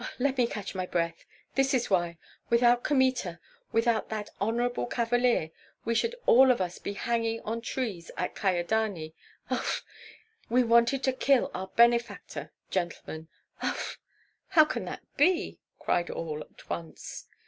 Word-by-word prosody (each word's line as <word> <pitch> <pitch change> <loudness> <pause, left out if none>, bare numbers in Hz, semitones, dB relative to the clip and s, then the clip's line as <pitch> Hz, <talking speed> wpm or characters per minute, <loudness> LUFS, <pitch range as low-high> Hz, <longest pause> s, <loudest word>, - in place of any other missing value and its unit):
Let 270 +1 +1
me 240 - +4
catch 205 -3 -5 0.2
breath. 170 -1 -1 0.3
This 270 0 +2
is 245 -4 0
why, 175 -2 +1 0.3
without 240 +1 +4
Kmita, 255 - +1 0.3
without 230 -1 +2
that 215 -1 -4
honorable 240 +4 0
cavalier, 240 -8 +1 0.3
we 230 - +1
should 465 - +1
all 260 +2 +7
of 250 - +4
us 180 -2 -3
be 200 - -4
hanging 230 +1 -1
on 230 +2 -3
trees 220 -9 -3
at 180 - -2
Kyedani. 185 -3 0 0.4
Uf! - - -1 0.6
we 250 +2 +4
wanted 235 +3 +4
to 260 - +2
kill 265 0 +3
our 190 +1 -4
benefactor, 235 -1 +2 0.2
gentlemen! 170 -3 -3 0.3
Uf!" - - -3 0.5
"How 310 -2 +6
can - - -3
that - - -6
be?" 350 +5 +2 0.2
cried 175 -1 0
all, 155 -2 -4
at - - -14
once. 165 -1 -6
230 Hz, 140 wpm, -29 LUFS, 185-245 Hz, 0.6 s, all